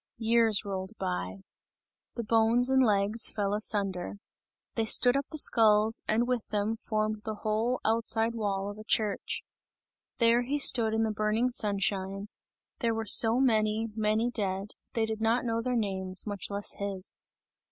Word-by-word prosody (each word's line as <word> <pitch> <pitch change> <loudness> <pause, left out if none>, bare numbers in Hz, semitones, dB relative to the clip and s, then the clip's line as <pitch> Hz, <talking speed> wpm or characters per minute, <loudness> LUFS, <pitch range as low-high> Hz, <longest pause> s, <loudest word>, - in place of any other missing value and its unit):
Years 225 -2 +2
rolled 190 +1 -5
by. 90 +1 -4 0.7
The 235 - -4
bones 230 +3 +4
and 265 0 +4
legs 210 0 +2
fell 205 -2 -2
asunder. 200 -4 -2 0.6
They 225 - -1
stood 245 +3 +4
up 275 0 -2
the 310 - -8
skulls, 220 -4 +3
and 230 +3 +1
with 250 -3 -2
them, 210 +1 -2
formed 215 -1 -3
the 215 -1 -5
whole 220 +4 -1
outside 225 0 +1
wall 200 -3 -3
of 205 - -12
a - - -9
church. 215 -2 -1 0.7
There 235 0 +3
he 270 +4 -2
stood 230 -6 +5
in 225 - +1
the 220 - -1
burning 215 +4 -1
sunshine; 200 -2 -2 0.5
there 230 -2 -1
were 225 0 -4
so 225 +3 +5
many, 220 -3 +1
many 220 +2 0
dead, 195 -2 -4 0.2
they 225 -1 0
did 220 0 -5
not 230 +3 +1
know 230 -1 -1
their 250 +1 -2
names, 190 -3 -1
much 205 -3 -5
less 200 0 -4
his. 200 -1 -5
220 Hz, 160 wpm, -28 LUFS, 205-230 Hz, 0.7 s, stood